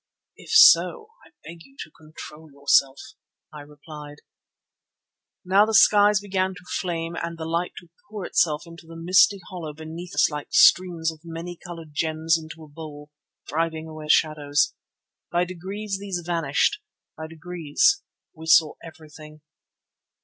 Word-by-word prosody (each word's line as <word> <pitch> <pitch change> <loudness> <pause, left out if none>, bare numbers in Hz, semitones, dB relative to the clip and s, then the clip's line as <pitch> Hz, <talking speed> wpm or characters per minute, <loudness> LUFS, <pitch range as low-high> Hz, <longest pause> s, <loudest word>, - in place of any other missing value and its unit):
"If - - -16
so, 460 -1 +5
I - - -19
beg 165 +1 -11
you 275 0 -22
to - - -17
control 155 0 -13
yourself," 140 -1 +2 0.6
I 150 - -9
replied. 145 0 -12 1.3
Now 195 +3 +4
the 220 - 0
skies 210 +1 +5
began 190 -2 -2
to 180 - -14 0.2
flame 170 -2 -4
and 170 0 -5
the 160 - -6
light 170 +2 -2
to 175 - -12 0.2
pour 205 -4 -6
itself 155 -1 +1
into 165 -1 -14
a - - -10
misty 185 +4 +3
hollow 165 -5 -7
beneath 160 +3 -9
us - - +3
like 150 0 -6
streams 170 -3 +4
of 160 - -15
many 170 +1 -7
coloured 165 -3 -11
gems 160 +1 0
into 160 0 -8
a - - -13
bowl, 150 -1 -11 0.3
driving 160 +1 -3
away 155 -1 -9
the - - -11
shadows. 150 -2 +2 0.6
By 175 +1 +1
degrees 195 +3 -6
these 190 -3 -5
vanished; 170 - 0 0.4
by 160 - -7
degrees 165 - 0 0.3
we 160 -1 -11
saw 160 -1 +5
everything. 155 -1 -13
165 Hz, 150 wpm, -24 LUFS, 155-180 Hz, 1.3 s, so